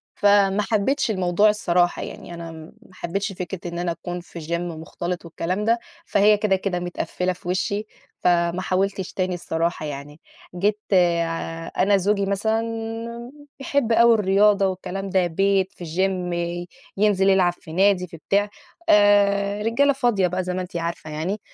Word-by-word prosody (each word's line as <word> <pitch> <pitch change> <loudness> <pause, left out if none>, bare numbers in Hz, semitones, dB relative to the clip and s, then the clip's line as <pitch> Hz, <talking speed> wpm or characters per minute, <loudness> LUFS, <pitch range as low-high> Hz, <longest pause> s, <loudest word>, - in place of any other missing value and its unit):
فما 205 0 +4
حبيتش 225 +6 0
الموضوع 185 +1 +3
الصراحة، 175 -4 +1
يعني 175 - -8
أنا 170 -1 -7
ما 160 0 -11 0.2
حبيتش 195 +3 -3
فكرة 180 -1 -6
إن 170 - -4
أنا 175 -1 -1
أكون 175 +1 -6
في 175 0 -11
جيم 170 +2 -3
مختلط 175 +2 -5
والكلام 175 +4 -3
ده، 230 +2 +3 0.3
فهي 210 +1 +4
كده، 205 -2 +2
كده 190 -1 -2
متقفِّلة 180 +1 -2
في 175 0 -11
وشي، 200 +3 -1 0.3
فما 170 0 +2
حاولتش 190 0 -1
تاني 185 -1 -1
الصراحة 165 -2 -2
يعني، 145 +2 -7 0.4
جيت 205 +3 +1 1.0
أنا 200 +2 +4
زوجي 200 +1 +1
مثلًا 220 +3 0 1.0
بيحب 270 -3 0
أوي 235 +1 +6
الرياضة 200 -1 +4
والكلام 190 +1 -4
ده، 185 -1 +2
بيت 195 +2 +1
في 180 - -10
جيم 180 +2 -1 0.6
ينزل 195 -1 +3
يلعب 190 -2 +4
في 160 -2 -13
نادي 190 +1 +3
في 165 - -11
بتاع 200 +5 0 0.4
آآ، 205 0 +4
رجالة 235 +6 +3
فاضية 240 -8 +1
بقى 180 +1 -2
زي 180 0 -3
ما 185 - -2
أنتِ 180 -1 -8
عارفة 170 -2 -4
يعني. 170 +8 -3
190 Hz, 155 wpm, -23 LUFS, 175-205 Hz, 1.0 s, أوي